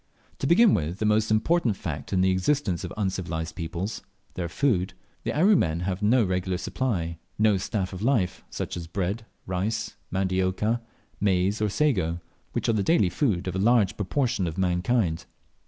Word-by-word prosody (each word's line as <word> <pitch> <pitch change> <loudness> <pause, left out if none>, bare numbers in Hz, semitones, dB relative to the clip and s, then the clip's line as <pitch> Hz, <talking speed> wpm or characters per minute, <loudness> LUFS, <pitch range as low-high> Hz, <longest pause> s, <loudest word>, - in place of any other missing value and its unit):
To 135 - -1
begin 195 +6 +6
with 80 +4 -1
the 110 - -1
most 105 +1 +3
important 115 - +2
fact 80 -7 -5
in 95 -2 +2
the 95 0 +4
existence 95 - 0
of 90 - -5
uncivilized 85 -5 -2
peoples 85 +5 -4 0.3
their 85 -2 -3
food 95 -3 0 0.3
the - - -1
Aru 190 +8 +4
men 80 - +1
have 95 +2 -2
no 115 +4 +4
regular 90 -1 -1
supply, 90 -8 -2 0.2
no 105 -1 +4
staff 100 -1 -2
of 90 - -6
life, 105 -7 +1
such - - -4
as 85 -2 -6
bread, 100 +6 -3 0.2
rice, 100 +4 -2
mandiocca, 95 +4 0 0.4
maize, 100 +1 +1
or 105 - +2
sago, 95 - +1 0.3
which - - -1
are 115 - +3
the 105 - +1
daily 105 - +3
food 95 - 0
of 90 - -3
a - - 0
large 110 -1 +3
proportion 105 -2 0
of 80 - -5
mankind. 90 -1 +1
95 Hz, 170 wpm, -26 LUFS, 90-110 Hz, 0.4 s, begin